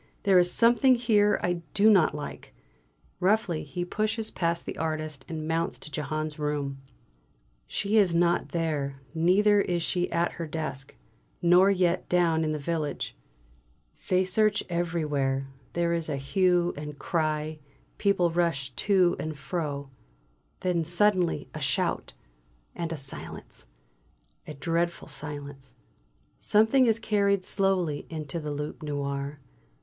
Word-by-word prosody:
There 195 -3 +6
is 175 0 +3
something 240 +3 +5
here 215 -4 +3
I 175 -1 0
do 205 +1 +5
not 190 -8 +5
like!" 150 - -8 0.6
Roughly 190 -3 +1
he 175 +4 -4
pushes 215 +3 -2
past 170 -1 -1
the - - -6
artist 155 -3 -3
and 155 -1 -4
mounts 165 +1 -1
to 150 - -10
Jehane's 155 +1 -3
room. 145 -2 -2 0.9
She 205 - 0
is 190 -5 +4
not 170 0 +2
there, 150 -5 -2
neither 200 +5 +4
is 175 -3 -1
she 180 +1 -1
at 170 +1 +1
her 165 -1 -6
desk. 150 -4 -5 0.4
Nor 180 +3 +5
yet 180 -2 +1
down 170 -2 +3
in 155 - 0
the 155 - -1
village. 155 0 -3 0.9
They 185 0 +4
search 205 +3 +2
everywhere; 150 -6 -1 0.2
there 170 0 +1
is 165 -1 -2
a 140 - -1
hue 175 +4 +2
and 150 0 -7
cry; 155 -1 -1 0.4
people 190 -4 +2
rush 165 -6 0
to 185 - +3
and 155 -1 -4
fro. 140 -2 -4 0.7
Then 180 -2 +1
suddenly 180 +1 +2
a - - -6
shout; - - -1 0.6
and 170 -1 -4
a 165 - -3
silence, 135 - -5 0.8
a 150 - -7
dreadful 170 +4 -1
silence. 145 -2 -7 0.6
Something 220 +5 +4
is 225 -1 +3
carried 200 -3 +1
slowly 185 -8 0
into 155 0 -5
the 150 -1 -5
"Loup 150 +1 -5
Noir." 140 -1 -3
170 Hz, 135 wpm, -27 LUFS, 150-185 Hz, 0.9 s, There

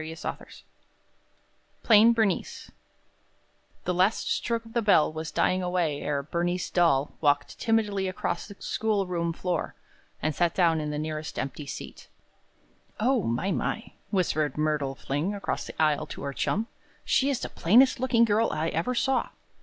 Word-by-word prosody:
Selected, 160 - -7 1.2
PLAIN 225 +1 +7
BERNICE 220 -5 -1 1.1
The 180 - -1
last 185 +5 +1
stroke 230 -1 -1
of 225 - -13
the 235 - +1
bell 180 -8 +4
was 160 0 -5
dying 185 0 +1
away 175 -5 -1
ere 140 -1 -1
Bernice 175 +4 -2
Dahl 155 -6 +2
walked 145 -1 +1
timidly 210 -4 +1
across 185 -2 -3
the 200 - -11
schoolroom 185 -6 -1
floor, 175 +1 -3 0.4
and 155 - -1
sat 170 +2 +1
down 165 -4 +3
in 150 - -3
the 150 - -3
nearest 155 0 -4
empty 140 +2 -4
seat. - - -8 0.9
"O, 245 +2 +2
my, 130 +8 -1
my!" 225 - -2 0.2
whispered 155 -7 0
Myrtle 150 -3 0
Fling 150 +11 -2
across 200 - -3
the - - -10
aisle 155 -2 +2
to - - -8
her 140 0 -3
chum. 215 +10 -1 0.4
"She 275 - +2
is 275 - -1
the - - -4
plainest 250 +9 +4
looking 240 -2 +3
girl 220 +1 +2
I 155 +2 -1
ever 170 +12 -1
saw." 265 +1 +1
180 Hz, 155 wpm, -27 LUFS, 155-220 Hz, 1.2 s, PLAIN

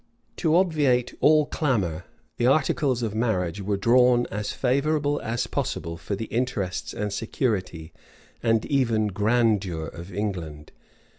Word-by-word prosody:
To 160 -2 +2
obviate 150 -9 +2
all 155 0 +5
clamor, 100 - -1 0.3
the 120 - +2
articles 135 -2 +2
of 110 -3 -2
marriage 100 -5 -1
were 100 +1 -1
drawn 120 +3 +4
as 105 +1 -3
favorable 145 +3 0
as 115 +1 -2
possible 85 0 -3
for 85 +5 -4
the 110 +3 -4
interests 115 -7 -2
and 105 -1 -3
security, 95 -7 -2 0.5
and 115 -2 +2
even 115 -6 +1
grandeur 105 -5 +1
of 85 +4 -9
England. 85 -7 -4
110 Hz, 130 wpm, -25 LUFS, 95-130 Hz, 0.5 s, all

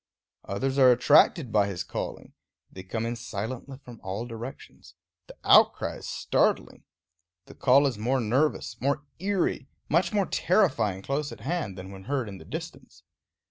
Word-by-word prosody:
Others 135 +7 -2
are 130 -1 +8
attracted 125 +2 +4
by 105 -2 +3
his 95 -1 -4
calling; - - -6 0.4
they 95 - -9
come 110 +5 -4
in 120 +1 -2
silently 120 +4 -6
from 120 -2 -11
all 100 +5 -4
directions; 120 +2 -10 0.3
the - - -13
outcry - - +4
is - - -9
startling. - - 0 0.6
The - - -13
call 135 +2 +4
is 125 -6 -1
more 130 +5 +1
nervous, 120 0 0
more 140 +3 0
eerie, 190 -7 -1 0.2
much 170 +3 +2
more 205 -3 +1
terrifying 135 - +1
close 140 +4 -2
at - - -10
hand 140 - -3
than 95 +1 -8
when 95 -1 -11
heard 135 -3 -1
in 100 -2 -8
the - - -13
distance. - - -8
125 Hz, 160 wpm, -27 LUFS, 105-140 Hz, 0.6 s, are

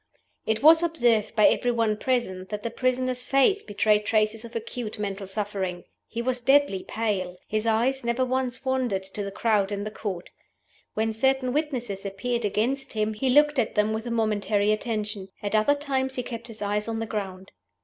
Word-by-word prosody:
It 220 +3 0
was 325 +2 +8
observed 240 -11 +2
by 215 - +5
every 245 - +3
one 230 -3 +1
present 210 -6 -1
that 210 -1 -5
the 230 - -3
prisoner's 255 0 0
face 275 +11 +3
betrayed 210 0 +2
traces 215 +1 +1
of 235 0 -11
acute 230 0 -5
mental 200 -1 -4
suffering. 190 -3 -3 0.2
He 235 0 -4
was 250 0 0
deadly 270 -6 +3
pale. 200 -5 -2
His 215 +1 -1
eyes 240 +4 +1
never 235 +2 +1
once 255 0 -1
wandered 255 -7 0
to 190 +2 -6
the 200 - -4
crowd 205 -1 +1
in 200 0 -2
the 210 - -5
Court. 195 -5 -5 0.6
When 220 +1 0
certain 260 +2 +1
witnesses 250 -10 -2
appeared 215 +4 -2
against 255 +7 -1
him, 215 0 0
he 260 +5 -1
looked 295 +1 +5
at 225 - 0
them 210 +1 +2
with 220 +2 -4
a - - -2
momentary 210 -2 +1
attention. 215 -2 -2 0.2
At 205 - -2
other 215 +7 +4
times 265 -2 -2
he 250 - -2
kept 235 -1 -7
his 220 -3 -7
eyes 210 +1 -1
on 225 0 -2
the 225 - -2
ground. 195 -4 -5
225 Hz, 190 wpm, -26 LUFS, 210-255 Hz, 0.6 s, was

